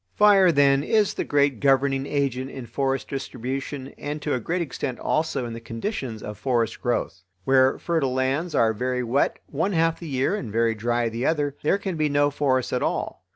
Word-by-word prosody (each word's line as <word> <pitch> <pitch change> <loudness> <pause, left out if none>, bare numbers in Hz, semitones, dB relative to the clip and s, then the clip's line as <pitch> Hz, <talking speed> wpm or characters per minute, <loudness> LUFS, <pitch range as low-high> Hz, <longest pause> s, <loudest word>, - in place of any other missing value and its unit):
Fire, 200 -3 +6
then, 140 -2 +4
is 210 +6 +2
the - - -2
great 140 -4 +1
governing 135 0 +2
agent 135 -2 -1
in 130 -3 -8
forest 135 +3 -1
distribution 135 +1 -5
and 150 +1 -4
to 150 - 0
a 125 - 0
great 170 +9 -1
extent 130 -3 -4
also 155 -5 -1
in 115 - -5
the 115 - -6
conditions 115 - -5
of 105 -1 -7
forest 115 -1 0
growth. 120 -6 -1 0.2
Where 130 +2 +4
fertile 150 -7 -1
lands 135 +6 0
are 110 -1 +3
very 125 +3 -1
wet 125 +4 +1
one 165 +8 -1
half 165 -1 +1
the 170 - -7
year 135 +3 0
and 120 - -5
very 115 +1 +2
dry 120 +2 0
the 115 +3 -2
other, 145 -3 0
there 155 - +2
can 190 -4 -4
be 155 -1 +1
no 145 0 +2
forests 130 -3 0
at - - 0
all. - - -2
135 Hz, 200 wpm, -24 LUFS, 120-150 Hz, 0.2 s, Fire